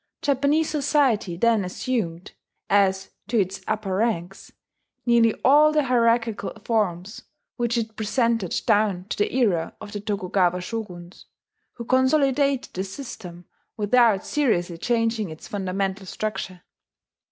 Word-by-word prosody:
Japanese 285 +3 +2
society 275 - +1
then 225 +1 +3
assumed, 180 -3 -3 0.4
as 195 -1 +2 0.2
to 225 +1 +1
its 190 -1 -1
upper 215 -3 -2
ranks, 195 -4 -2 0.5
nearly 235 -2 +4
all 300 +3 +6
the 305 -1 +2
hierarchical 235 -3 +1
forms 205 -3 -1 0.4
which 240 -1 0
it 220 -1 -3
presented 225 -3 0
down 205 -5 +2
to - - -3
the 205 - +1
era 195 -11 +1
of 210 -1 -9
the 205 - -4
Tokugawa 185 -3 0
shoguns, 180 -3 -7 0.5
who 235 - -8
consolidated 270 +1 +2
the 185 - -2
system 190 -5 -9 0.3
without 220 -1 +3
seriously 175 - 0
changing 230 -3 0
its 155 0 -10
fundamental 195 0 -3
structure. 190 -4 -5
215 Hz, 120 wpm, -24 LUFS, 190-240 Hz, 0.5 s, all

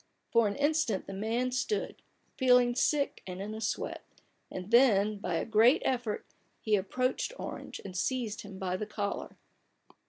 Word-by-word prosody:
For 230 -2 +4
an 200 - -2
instant 290 -8 +1
the 195 - -7
man 230 +6 -1
stood, 270 - -2 0.3
feeling 250 -2 +5
sick 285 +3 +1
and 180 0 -6
in 205 +2 -5
a 220 - -6
sweat; - - -3 0.5
and 185 +3 -7
then, 215 -4 +5
by 180 -3 -2
a - - -1
great 230 +7 +5
effort, 245 -5 -1 0.3
he 215 -1 +2
approached 255 - -1
Orange, - - -6
and 185 -2 -7
seized 225 +1 -1
him 200 -2 -10
by 185 -1 -2
the 210 - -4
collar. 205 -1 -4
220 Hz, 160 wpm, -31 LUFS, 200-255 Hz, 0.5 s, feeling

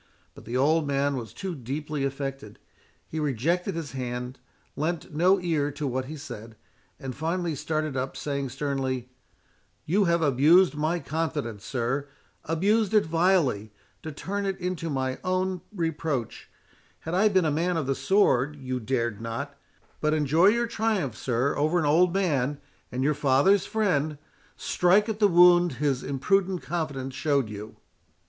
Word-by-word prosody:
But - - -14
the 120 +3 -2
old 150 +3 +2
man 140 0 +1
was 120 -4 -6
too 190 -2 -5
deeply 145 +2 -4
affected—he 135 +2 -7
rejected 160 - 0
his 160 -4 -5
hand, 125 0 -5 0.4
lent 160 +1 -3
no 180 +5 +4
ear 160 -5 0
to 145 +1 -4
what 130 -1 -2
he 155 +3 -7
said, 115 -6 -9 0.4
and 130 -1 -5
finally 165 +2 -1
started 155 0 -2
up, 130 +1 -3
saying 140 -2 -3
sternly, 130 -2 -2 0.8
"You 195 +5 +2
have 170 -1 +2
abused 155 +7 +5
my 155 +3 0
confidence, 150 - -3
sir—abused 155 - -1
it 210 - +5
vilely, 160 - +1 0.3
to 155 - -6
turn 200 +7 -3
it 195 -1 -2
into 180 -2 -3
my 130 -2 -2
own 185 0 -1
reproach: 160 - -3 0.5
had 160 - -5
I 205 +4 +4
been 190 -4 +2
a 155 - +2
man 170 +4 0
of 155 - -1
the 135 - +1
sword, 150 -6 +2
you 130 -3 -4
dared 115 -2 -2
not—But 140 +5 -5
enjoy 155 +4 +4
your 235 +3 +3
triumph, 215 - -1
sir, 125 +5 0
over 155 +4 +1
an 165 - +1
old 170 +5 +4
man, 145 -7 0 0.3
and 125 +1 -2
your 150 +2 +3
father's 145 +7 +3
friend—strike 180 +2 0
at 215 -1 -3
the 210 - +6
wound 175 -2 +6
his 135 0 0
imprudent 185 +7 0
confidence 140 -6 -3
showed 140 -6 0
you." 105 +1 -8
150 Hz, 150 wpm, -26 LUFS, 135-175 Hz, 0.8 s, the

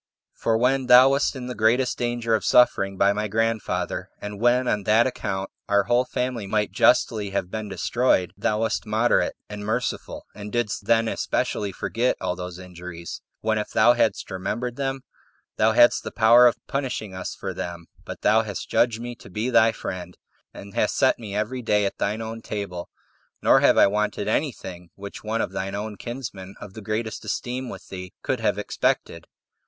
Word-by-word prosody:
For 115 -1 0
when 130 +2 +1
thou 125 +2 +8
wast 140 +1 +1
in 130 -2 -6
the 125 - -4
greatest 120 +3 +2
danger 120 -1 -1
of 110 - +1
suffering 95 -6 +3
by 100 +1 +4
my 105 +1 -2
grandfather, 115 +1 -1
and 105 0 -7
when, 125 +1 +3
on 105 - +1
that 110 +2 +4
account, 95 -6 -3 0.2
our 100 0 +4
whole 120 +5 +2
family 125 -5 -3
might 105 +1 0
justly 105 -2 +3
have 95 -2 -3
been 110 -1 -4
destroyed, 100 -3 +1
thou 105 +1 0
wast 110 -1 -1
moderate 110 +3 +2
and 105 0 -7
merciful, 115 +4 -3
and 105 0 -8
didst 110 -3 -2
then 115 0 +3
especially 105 -2 -1
forget 115 +7 -1
all 90 -1 -2
those 90 -1 -7
injuries, 90 -2 -8 0.2
when, 110 0 +1
if 105 - -4
thou 120 +3 +5
hadst 120 - 0
remembered 110 +6 -3
them, 135 0 -2 0.6
thou 110 +1 +3
hadst 120 +1 +5
the - - -4
power 120 +2 +6
of 120 - +1
punishing 130 -7 -3
us 95 0 -5
for - - -5
them; 85 -1 -6 0.2
but - - -8
thou 110 +1 +4
hast 105 -3 -6
judged 115 -2 +2
me 120 +1 -5
to 115 - -14
be 110 +7 -2
thy 115 -1 +5
friend, 90 -4 -7 0.3
and 100 0 -11
hast 105 - 0
set 130 - +3
me 105 -4 -7
every 110 +5 -2
day 105 -3 +2
at 100 - -3
thine 110 +3 -1
own 115 +1 -6
table; 100 -6 -5 0.5
nor - - +6
have - - +4
I - - +8
wanted 105 0 -1
any 140 +7 +1
thing 90 -5 -10
which 100 0 -9
one 110 +1 -1
of - - -2
thine 95 +1 -4
own 105 +1 -4
kinsmen, 100 -5 -7
of 100 - -10
greatest 110 +1 -3
esteem 125 +4 -3
with - - -10
thee, 90 -1 -8
could - - -1
have - - 0
expected." 85 0 -1
110 Hz, 190 wpm, -24 LUFS, 100-120 Hz, 0.6 s, thou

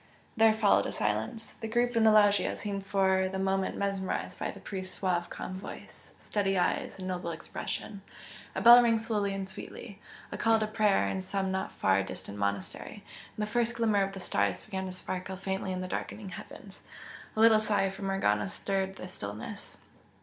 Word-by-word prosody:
There 225 -1 +6
followed 215 -2 +3
a - - -3
silence. 110 - -2
The 225 - -3
group 240 +2 +1
in 230 - +4
the 220 - +7
loggia 205 -1 +4
seemed 200 -1 -4
for 190 -1 +2
the 190 - -4
moment 190 0 0
mesmerised 195 -1 -2
by - - -2
the - - -8
priest's 185 -2 -6
suave 175 -2 0
calm 185 0 -6
voice, - - -10
steady 195 -2 0
eyes 180 - 0
and 185 -1 -6
noble 180 -2 -3
expression, 180 +4 -5 0.5
A - - -1
bell 240 +2 +11
rang 230 -1 +3
slowly 215 -3 -1
and 195 -1 -4
sweetly 200 +2 -9 0.3
a - - -5
call 225 0 +4
to 215 - 0
prayer 215 -2 +2
in 190 - -2
some 190 0 -2
not 190 0 -2
far 95 0 +2
distant 100 +1 -6
monastery, 100 -1 -3 0.3
and 215 - -1
the - - +1
first 235 +2 0
glimmer 220 -4 +2
of 195 0 -1
the 195 - -6
stars 100 - 0
began 190 -1 -4
to - - -5
sparkle 185 0 -5
faintly 190 0 -3
in 185 0 -2
the 185 - -4
darkening 200 +2 -5
heavens. - - -10 0.5
A - - -3
little 220 -1 +7
sigh 205 -3 +1
from 195 0 -5
Morgana 105 - +1
stirred 190 - -2
the 185 - -8
stillness. 105 - -7
195 Hz, 190 wpm, -30 LUFS, 185-215 Hz, 0.5 s, bell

